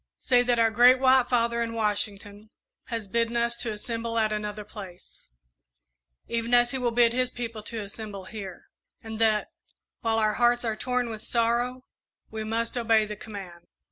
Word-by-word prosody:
"Say 245 -1 +3
that 245 -1 +1
our 225 -1 +3
Great 245 +3 +7
White 260 -1 +4
Father 235 -1 +1
in 230 0 -2
Washington 210 -1 -2 0.4
has 230 -4 -4
bidden 230 +3 0
us 235 0 +1
to 235 - -2
assemble 230 +2 -4
at 215 -1 +2
another 210 0 -4
place, 195 -4 -11 1.0
even 235 +1 +1
as 240 0 +4
he 265 - -2
will 245 -1 +1
bid 235 0 +3
his 255 0 +1
people 230 -3 -6
to 220 0 -5
assemble 200 -1 -8
here, 195 -2 -9 0.3
and 220 -1 -7
that, 215 -2 +2 0.5
while 225 -1 0
our 215 -1 +2
hearts 240 +1 +2
are 220 -1 -1
torn 250 +1 -1
with 220 -1 -6
sorrow, 240 +2 0 0.5
we 220 0 -4
must 230 +2 -2
obey 225 -2 +3
the 210 0 -6
command. 190 -5 -10
230 Hz, 175 wpm, -27 LUFS, 215-240 Hz, 1.0 s, Great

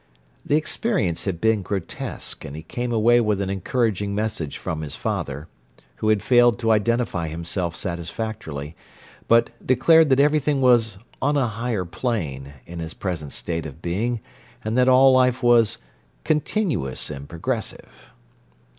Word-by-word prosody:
The 145 - +1
experience 155 - 0
had 95 -4 -2
been 110 +1 +2
grotesque, 95 -2 -5
and 70 - -7
he 80 - -7
came 120 +9 -4
away 120 +1 +4
with 105 -3 +1
an 95 -1 -1
encouraging 100 0 -1
message 105 -8 -2
from 80 - -4
his 75 -2 -5
father, 70 +3 -3 0.5
who 110 - -2
had 105 -2 +2
failed 120 -3 +5
to 115 -1 +1
identify 110 -5 +1
himself 85 +2 -3
satisfactorily, 85 -4 -5 0.5
but 115 0 +4
declared 155 +5 +5
that 130 0 +4
everything 150 0 +3
was 120 -6 +3 0.2
"on 145 +2 +2
a 135 - +2
higher 115 -3 -2
plane" 80 - -3
in 85 0 -8
his 80 0 -6
present 80 -7 -4
state 80 -2 -4
of 75 +1 -11
being, 110 +8 -2 0.4
and 110 +1 -2
that 125 0 +4
all 130 +1 +7
life 130 0 +3
was 120 -3 +4 0.5
"continuous 150 - -1
and 70 +1 -8
progressive." 110 +7 -5
110 Hz, 145 wpm, -23 LUFS, 85-125 Hz, 0.5 s, all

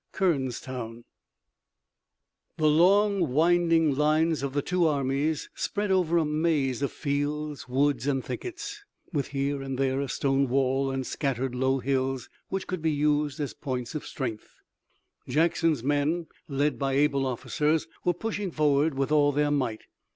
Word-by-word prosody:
KERNSTOWN 130 -8 -2 1.5
The 155 - 0
long 185 +1 +4
winding 165 0 +3
lines 155 +2 +2
of 140 -1 -3
the 145 -1 0
two 180 -2 +2
armies 140 +1 0
spread 205 -1 -2
over 175 -3 +3
a 165 - +3
maze 150 -4 0
of 140 - 0
fields, 145 -1 -3
woods 135 0 +1
and 135 -3 0
thickets, 410 +3 -6 0.3
with 145 -3 0
here 140 0 -2
and 135 -1 -4
there 135 0 +1
a 140 - -3
stone 135 0 +1
wall 135 +1 +1
and 135 -1 -2
scattered 135 -2 -2
low 130 +1 +1
hills, 130 -1 -1 0.2
which 190 0 -2
could 185 -3 -4
be 160 - +1
used 150 0 +1
as 145 -2 -3
points 125 -4 -4
of 155 - -4
strength. 115 -6 -5 0.7
Jackson's 160 -3 +2
men, 145 +5 +1 0.2
led 145 +1 0
by 135 -1 0
able 140 -1 +2
officers, 150 +5 0 0.2
were 175 - +2
pushing 205 0 -3
forward 150 -1 +2
with 135 +2 -1
all 145 -1 +4
their 145 +1 +1
might. 130 -7 -1
145 Hz, 150 wpm, -27 LUFS, 135-160 Hz, 1.5 s, long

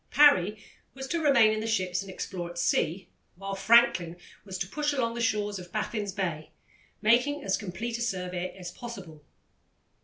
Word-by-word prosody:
Parry 215 -8 +5 0.4
was 265 0 -6
to 330 +5 -2
remain 270 -8 +5
in 215 - -1
the 220 - -3
ships 185 -4 0
and 195 - -9
explore 180 -2 -5
at 175 - -10
sea, 175 +1 0 0.3
while 195 +2 -6
Franklin 195 -5 +4 0.3
was 190 -2 -6
to 175 - -3
push 295 +7 -1
along 235 -4 0
the 235 - -4
shores 210 -3 0
of 180 -1 -11
Baffin's 210 -1 -2
Bay, 170 -6 -3 0.5
making 250 +7 +3
as 195 - +1
complete 220 +4 -4
a - - -4
survey 180 -5 -3
as 180 -2 -7
possible. 175 -10 -9
205 Hz, 175 wpm, -28 LUFS, 180-235 Hz, 0.5 s, Parry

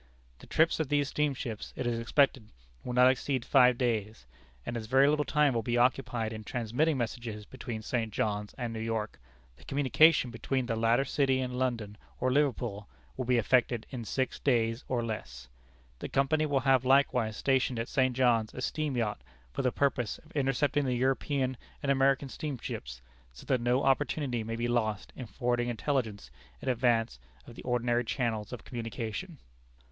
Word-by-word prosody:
The - - -14
trips 165 +1 +2
of 155 -4 -1
these 145 -1 +1
steamships, 135 -7 -2
it - - -3
is 120 -1 0
expected, 125 -1 +2 0.3
will 125 - -4
not 125 +1 +6
exceed 130 -1 -2
five 125 -3 +5
days, 110 - -1 0.4
and 120 - -4
as 110 -2 -4
very 135 +3 +5
little 150 0 +2
time 150 0 +2
will 115 - 0
be 120 +2 -1
occupied 120 -2 +1
in 110 0 -7
transmitting 125 +7 0
messages 115 -3 -4
between 120 -3 -7
St. 115 -1 -2
John's 105 0 -2
and 120 -3 -3
New 110 - -5
York, 110 -1 -3 0.4
the - - -17
communication 145 0 +4
between 130 +2 -2
the 115 -2 -1
latter 115 +4 +2
city 135 -1 +1
and 125 -1 -3
London 115 -5 -2 0.2
or 130 0 +1
Liverpool, 120 -7 0 0.3
will 125 - -3
be 125 0 +3
effected 120 0 +2
in 125 -3 -5
six 130 +4 -2
days, 115 -2 +1
or 120 -2 -1
less. 60 - -6 0.5
The - - -5
company 155 +3 +2
will 140 -2 +1
have 130 -2 +3
likewise 125 -4 +3
stationed 130 -2 +1
at 115 +1 -2
St. 130 -3 +1
John's 120 -4 +2
a - - -5
steam 150 -4 -2
yacht, 105 - -1 0.3
for - - -1
the 125 - +1
purpose 130 -5 0
of 160 - -19
intercepting 140 0 +1
the 125 -1 0
European 130 +1 0 0.3
and 140 - +2
American 135 0 +2
steamships, 115 - -6 0.3
so - - -13
that 130 -3 +1
no 125 +3 +2
opportunity 135 -3 +1
may 115 +1 -4
be 120 +1 -1
lost 110 -4 -1
in 125 - -7
forwarding 120 +3 -1
intelligence 120 -3 -2 0.3
in - - -3
advance 115 - +1 0.3
of - - -11
the - - -10
ordinary 120 -1 0
channels 115 -3 -2
of 125 - -7
communication." 120 - -5
125 Hz, 175 wpm, -30 LUFS, 115-135 Hz, 0.5 s, not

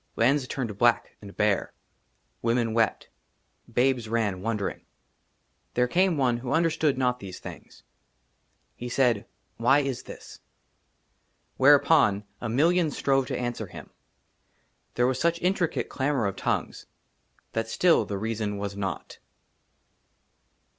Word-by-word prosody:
LANDS 130 +3 +2
TURNED 115 -8 -4
BLACK 120 -1 +2
AND 100 -1 -12
BARE; 105 -2 +1 0.7
WOMEN 115 -1 +1
wept; 115 -3 0 0.6
BABES 125 -3 +1
RAN, 105 -5 0
WONDERING. 105 -1 -2 0.9
THERE 125 0 +3
CAME 180 +4 +2
ONE 125 -3 +2
WHO 120 +1 -4
UNDERSTOOD 160 -4 +2
NOT 125 -1 +1
THESE 95 -4 -8
THINGS. - - -11 0.9
HE 125 - -6
SAID, 120 -4 +2 0.2
" - - -45
WHY 135 +5 +4
IS 135 -3 -3
THIS? - - -11 0.6
" - - -45
WHEREUPON 140 -6 +5 0.2
A 120 - -3
MILLION 165 +7 +3
STROVE 135 -2 +1
TO - - -3
ANSWER 120 -3 -3
HIM. - - -11 1.0
THERE 120 - +2
WAS 130 0 0
SUCH 170 +1 +2
INTRICATE 180 -1 0
CLAMOUR 135 -3 0
OF 100 - -2
TONGUES, - - -3 0.7
THAT 115 0 -1
STILL 175 +7 +3
THE 100 - -4
REASON 105 -1 -3
WAS 100 0 -4
NOT. 95 -4 -5
120 Hz, 130 wpm, -26 LUFS, 110-140 Hz, 1.0 s, WHEREUPON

